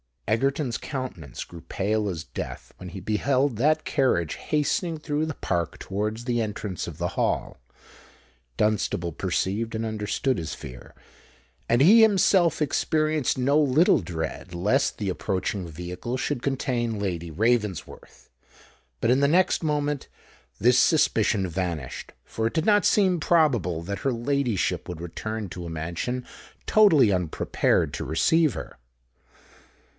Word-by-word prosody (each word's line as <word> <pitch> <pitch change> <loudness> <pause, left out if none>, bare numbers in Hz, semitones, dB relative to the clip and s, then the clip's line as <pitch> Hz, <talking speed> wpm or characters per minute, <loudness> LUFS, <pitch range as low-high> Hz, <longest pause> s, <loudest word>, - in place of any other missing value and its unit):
Egerton's 135 +3 0
countenance 130 - -6
grew 85 - -11
pale 105 +5 -1
as 85 -5 -4
death - - -7
when 90 - -8
he 95 +2 -8
beheld 130 +4 +1
that 150 +6 +2
carriage 85 - +1
hastening 160 +3 -1
through 150 0 -2
the 160 - -3
Park 85 -2 -2
towards 105 +4 -3
the 120 -1 0
entrance 105 -4 -4
of 85 -3 -7
the 85 0 -1
Hall. - - -1 1.0
Dunstable 105 -5 0
perceived 110 +8 -2
and 110 +1 -2
understood 110 +4 -1
his 80 -3 -5
fear; 60 -3 -11 0.7
and 120 +2 +3
he 210 +10 +8
himself 190 -6 +4
experienced 155 -1 0
no 140 +4 +3
little 150 +2 +4
dread 85 - -5
lest 105 +11 +1
the 100 -3 -2
approaching 95 +1 -2
vehicle 90 +9 -5
should 125 - -2
contain 125 -4 -1
Lady 85 -4 -3
Ravensworth. 105 0 -2 0.7
But, 115 - +3
in 130 - +4
the 140 - +4
next 175 +5 +3
moment, 145 -2 -1 0.5
this 125 +3 +5
suspicion 110 - +3
vanished; 85 -6 -4
for 110 0 -2
it - - -5
did 160 -1 0
not 205 -1 +4
seem 185 -4 +3
probable 120 - +2
that 100 +2 -4
her 135 +4 0
ladyship 120 -3 -1
would 85 -2 -6
return 105 +4 -5
to 90 0 -7
a - - -5
mansion 85 +11 -4 0.4
totally 160 - +5
unprepared 90 -4 0
to - - -4
receive 155 - +2
her. - - -8
115 Hz, 140 wpm, -25 LUFS, 90-140 Hz, 1.0 s, he